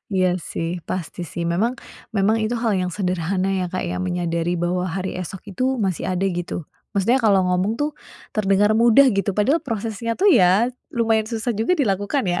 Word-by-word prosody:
Iya, 185 -1 +2
sih. 170 +2 -4
Pasti, 180 -1 -4
sih. 170 +2 -5
Memang 190 +9 +1 0.4
memang 200 +3 +3
itu 220 +2 -1
hal 230 -1 0
yang 180 -1 -1
sederhana 185 0 -1
ya, 185 -1 0
Kak, 185 +2 -3
ya, 180 +1 -3
menyadari 175 -1 -1
bahwa 180 +2 -1
hari 190 +2 -3
esok 190 +2 -7
itu 260 +7 0
masih 190 -4 -1
ada, 185 +1 0
gitu. 175 -2 -4 0.3
Maksudnya 230 +6 +2
kalau 200 -4 +4
ngomong 185 +5 0
tuh 295 +1 0 0.4
terdengar 205 0 +3
mudah 235 +4 +6
gitu, 195 +1 0
padahal 230 - +1
prosesnya 230 -1 -3
tuh 400 - +3
ya 195 - +5 0.2
lumayan 225 -2 +2
susah 230 0 -2
juga 225 - +1
dilakukan, 205 +2 0
ya? 175 -1 0
195 Hz, 180 wpm, -22 LUFS, 180-225 Hz, 0.4 s, mudah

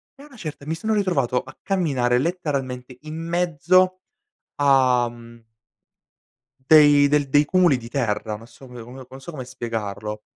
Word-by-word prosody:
e 280 - -15
a - - -13
una 270 -5 -17
certa, 155 -7 -8
mi 160 - -2
sono 220 +7 -2
ritrovato 145 - 0
a 130 - -14
camminare 140 -11 +1
letteralmente 135 -6 -3
in 155 +1 -8
mezzo 175 +2 +1 0.6
a, 130 -4 +3
mhmm 115 0 -15 1.3
dei 145 -2 +7
del 145 0 +1
dei 145 +2 +4
cumuli 175 -4 +3
di 115 -1 -10
terra, 110 -4 -2
non 115 +2 -12
so 125 +3 -16
pe 125 - -14
non 130 +2 -12
so 135 +6 -9
come 135 -6 -7
spiegarlo 105 -3 -5
135 Hz, 155 wpm, -22 LUFS, 125-165 Hz, 1.3 s, dei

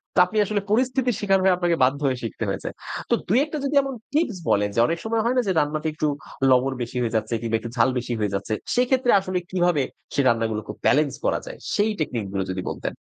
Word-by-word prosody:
তো - - +4
আপনি 215 +4 -5
আসলে 205 0 -1
পরিস্থিতির 250 0 +2
শিকার 195 -2 +3
হয়ে 190 -1 +5
আপনাকে 175 -1 +1
বাধ্য 135 +2 +2
হয়ে 130 -2 0
শিখতে 115 - -4
হয়েছে। - - -3 0.4
তো - - +3
২-১ 260 - +2
টা - - 0
যদি 285 - -1
এমন 275 0 -4 0.2
টিপস 290 - +1
বলেন, 100 0 +3
যে - - +2
অনেক 165 - -1
সময় 225 0 +1
হয়না 250 +2 +2
যে 190 - +2
রান্নাটা 150 +2 -1
একটু 155 0 -1 0.4
লবণ 130 +1 +3
বেশি 120 +1 -4
হয়ে 115 -1 -1
যাচ্ছে 110 +1 -1
কিংবা 115 -1 0
একটু 120 - -7
ঝাল 115 +2 +4
বেশি 125 0 -3
হয়ে 105 -2 -1
যাচ্ছে। 100 +3 -2 0.2
সেক্ষেত্রে 250 0 +3
আসলে 185 -1 -3
কিভাবে, 175 -5 +2 0.3
সে - - +2
রান্নাগুলো 115 -2 +1
খুব - - -7
বেলেন্স 150 -1 +3
করা - - +2
যায়? - - -8 0.2
সেই 210 +1 +2
টেকনিক 125 -8 -2
গুলো 95 -1 -1
যদি 95 - -3
বলতেন। - - -3
165 Hz, 225 wpm, -24 LUFS, -, 0.4 s, হয়ে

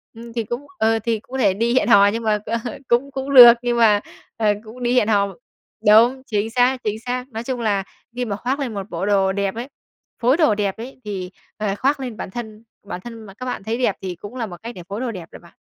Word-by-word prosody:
ừm, 230 0 -10
thì 230 - -1
cũng 240 +6 -5
ờ, 225 0 +3
thì 225 0 -1
cũng 225 - -26
có 265 - -3
thể 200 -7 +3
đi 230 +5 0
hẹn 260 - +3
hò 200 -4 +7
nhưng 225 +3 -1
mà, 215 -1 +1
ơ, 230 +2 -1 0.3
cũng 255 +4 +1
cũng 270 +1 -4
được 240 -2 +11
nhưng 240 -1 0
mà, 215 -3 +5 0.4
ờ, 215 -2 +3
cũng 235 +3 -10
đi 240 - +1
hẹn 250 -4 +3
hò 200 -2 +3 0.6
đúng, 235 +5 +6
chính 215 -2 -1
xác, 250 +2 +2
chính 215 +1 -2
xác. 250 +1 -3
Nói 225 0 -5
chung 245 -1 -3
là 200 -3 +1 0.3
khi 250 0 -2
mà 205 -3 -3
khoác 255 +7 -2
lên 250 -5 -3
một 200 0 -6
bộ 175 +2 -3
đồ 195 -2 +2
đẹp 195 0 -2
ấy, 235 +3 -5 0.5
phối 255 +6 +3
đồ 305 -11 +3
đẹp 200 -2 -1
ấy, 255 +3 -9
thì, 190 -3 -4 0.3
ờ, 210 -2 -1
khoác 275 +6 +1
lên 245 -5 -6
bản - - -6
thân 220 -1 -7 0.2
bản 180 - -6
thân 230 +1 -10
mà 195 - -12
các 255 +5 -8
bạn 250 - -4
thấy 220 +3 -2
đẹp 245 -6 +1
thì 185 -2 -4
cũng 205 +8 -10
là 235 -3 -2
một 175 -4 -9
cách 235 +1 -7
để 175 - -9
phối 205 +4 -4
đồ 250 -3 -2
đẹp 180 -5 -8
rồi - - -11
bạn. 170 - -20
225 Hz, 265 wpm, -21 LUFS, 205-245 Hz, 0.6 s, được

